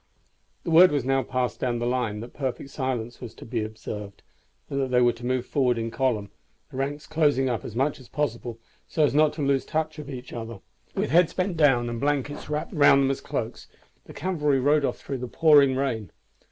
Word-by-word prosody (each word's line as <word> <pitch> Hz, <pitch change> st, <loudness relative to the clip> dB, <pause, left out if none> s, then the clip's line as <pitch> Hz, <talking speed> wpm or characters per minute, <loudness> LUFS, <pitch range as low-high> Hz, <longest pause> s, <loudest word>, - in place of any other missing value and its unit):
The 170 Hz, -, -3 dB
word 175 Hz, +2 st, +8 dB
was 145 Hz, -4 st, 0 dB
now 135 Hz, 0 st, +2 dB
passed 125 Hz, -1 st, -2 dB
down 120 Hz, -2 st, 0 dB
the 120 Hz, -, -2 dB
line 120 Hz, -4 st, -1 dB
that 120 Hz, -, -9 dB
perfect 135 Hz, 0 st, -4 dB
silence 120 Hz, -4 st, -3 dB
was 120 Hz, -3 st, -8 dB
to -, -, -11 dB
be 115 Hz, -2 st, -2 dB
observed, 105 Hz, -2 st, -7 dB, 0.4 s
and 140 Hz, 0 st, -2 dB
that 135 Hz, -, 0 dB
they 125 Hz, -1 st, +3 dB
were 120 Hz, -1 st, +4 dB
to 120 Hz, -, -13 dB
move 130 Hz, -1 st, 0 dB
forward 125 Hz, -4 st, +1 dB
in 115 Hz, 0 st, -3 dB
column, 115 Hz, -7 st, -1 dB, 0.4 s
the 130 Hz, -, -8 dB
ranks 145 Hz, +2 st, -3 dB
closing 145 Hz, -4 st, +2 dB
up 115 Hz, -, -3 dB
as 115 Hz, -, -8 dB
much 140 Hz, +4 st, 0 dB
as 130 Hz, -, -14 dB
possible 120 Hz, -5 st, -3 dB, 0.3 s
so 155 Hz, -, +1 dB
as 145 Hz, -, +3 dB
not 150 Hz, +1 st, +4 dB
to 150 Hz, -1 st, -4 dB
lose 135 Hz, -1 st, +2 dB
touch 155 Hz, 0 st, -2 dB
of 145 Hz, -2 st, -8 dB
each 130 Hz, -2 st, -8 dB
other. 115 Hz, -2 st, -6 dB, 0.4 s
With -, -, -1 dB
heads 170 Hz, +1 st, +4 dB
bent 185 Hz, -1 st, -1 dB
down, 135 Hz, -6 st, +3 dB
and 120 Hz, 0 st, -4 dB
blankets 145 Hz, 0 st, -1 dB
wrapped 150 Hz, 0 st, -3 dB
round 145 Hz, -2 st, +6 dB
them 135 Hz, -, +2 dB
as 135 Hz, -, -4 dB
cloaks, -, -, -4 dB, 0.4 s
the -, -, -12 dB
cavalry 150 Hz, -7 st, 0 dB
rode 145 Hz, +2 st, +3 dB
off -, -, -2 dB
through 135 Hz, -2 st, -5 dB
the 125 Hz, -, -4 dB
pouring 145 Hz, -1 st, +5 dB
rain. 115 Hz, -, -2 dB
135 Hz, 220 wpm, -25 LUFS, 120-145 Hz, 0.4 s, word